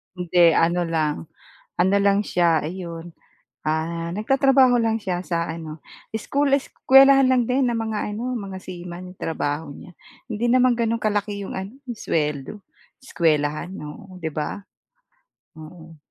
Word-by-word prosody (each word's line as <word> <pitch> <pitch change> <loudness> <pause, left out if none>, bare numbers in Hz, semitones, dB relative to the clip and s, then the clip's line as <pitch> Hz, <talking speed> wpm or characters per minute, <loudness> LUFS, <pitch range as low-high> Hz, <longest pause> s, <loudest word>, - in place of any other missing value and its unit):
Hindi 175 -1 +4
ano 170 +2 +2
lang 160 -3 0 0.6
ano 190 +3 +3
lang 200 0 +3
siya, 170 -4 +2
ayun, 170 0 -6 0.6
ah, 165 +2 -2
nagtatrabaho 265 +4 +4
lang 225 0 +1
siya 180 -3 -3
sa 170 -1 -1
ano 160 -1 -7 0.3
school 280 +6 0
eskuwelahan 270 -1 +5
lang 250 -1 +4
din 255 0 +2
ng 235 - -1
mga 220 -2 -3
ano 245 +4 -3
mga 195 -3 -6
seaman 180 0 -9
trabaho 150 -1 -3
niya. 175 - -13 0.4
Hindi 225 0 -2
naman 255 0 +4
ganun 230 -1 0
kalaki 205 -1 -1
iyong - - -7
ano 190 +3 -5
yung 240 -3 -6
sweldo, 150 -3 -2 0.5
eskuwelahan 155 - 0
oo 185 +5 -10
'di 160 -2 -3
ba? 150 +7 -4 1.0
Oo 165 0 -12
185 Hz, 140 wpm, -23 LUFS, 165-225 Hz, 1.0 s, eskuwelahan